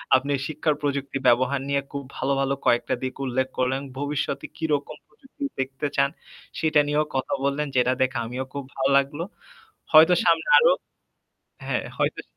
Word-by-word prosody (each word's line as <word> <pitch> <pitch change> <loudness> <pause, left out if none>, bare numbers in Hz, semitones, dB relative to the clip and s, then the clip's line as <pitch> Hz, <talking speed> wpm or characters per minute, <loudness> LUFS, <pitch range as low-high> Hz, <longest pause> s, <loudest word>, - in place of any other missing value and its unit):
আপনি 140 +2 +1 0.2
শিক্ষার 155 0 0
প্রযুক্তির 140 -1 -2
ব্যবহার 130 +3 +3
নিয়ে 140 0 +1
খুব 140 -1 -5
ভালো, 135 - -1
ভালো 135 0 +1
কয়েকটা 120 - +2
দিক 130 - -3
উল্লেখ 130 +1 0
করলেন। 130 +1 0 0.2
ভবিষ্যতে 145 0 -2
কিরকম 150 -3 -2
প্রযুক্তি 270 - -13 0.2
দেখতে 135 +2 -3
চান 140 -1 +3 0.5
সেটা 155 -1 +3
নিয়েও 150 +1 +1
কথা 130 -1 -1
বললেন 140 +2 0
যেটা 125 0 +3
দেখে 130 -1 +1
আমিও 125 +3 -4
খুব 140 0 -4
ভালো 135 0 +1
লাগলো। 140 +3 0 0.7
হয়তো 160 +3 +8
সামনে 165 -1 +3
আরও - - +5 1.0
হ্যাঁ, - - -1
হয়তো - - -1
140 Hz, 155 wpm, -24 LUFS, 130-150 Hz, 1.0 s, হয়তো